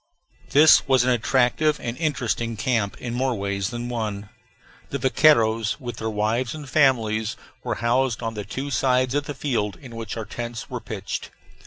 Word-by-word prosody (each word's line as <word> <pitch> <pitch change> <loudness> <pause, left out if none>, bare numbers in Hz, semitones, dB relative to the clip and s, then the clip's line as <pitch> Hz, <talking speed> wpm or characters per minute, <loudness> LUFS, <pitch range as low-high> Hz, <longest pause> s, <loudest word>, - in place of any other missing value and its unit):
This 150 +2 +6
was 130 -2 +4
an 125 - +2
attractive 130 +5 +2
and 115 0 -4
interesting 120 -7 -1
camp 110 -3 0
in 120 -1 -5
more 130 0 0
ways 100 -1 -2
than 120 0 -5
one. 105 -4 -4 0.6
The 140 - -2
vaqueiros 115 -5 +3
with 120 -4 -6
their 110 - -3
wives 110 +5 -1
and 150 -2 -8
families 115 -7 +2 0.3
were - - -2
housed 120 0 0
on 115 0 -2
the 105 -1 -5
two 140 +7 -5
sides 130 +1 +2
of 145 0 0
the 145 - -5
field 115 -8 -1
in 125 -5 -11
which 115 0 -5
our 110 - -4
tents 120 +1 -6
were - - -4
pitched. - - -5
120 Hz, 175 wpm, -24 LUFS, 110-130 Hz, 0.6 s, This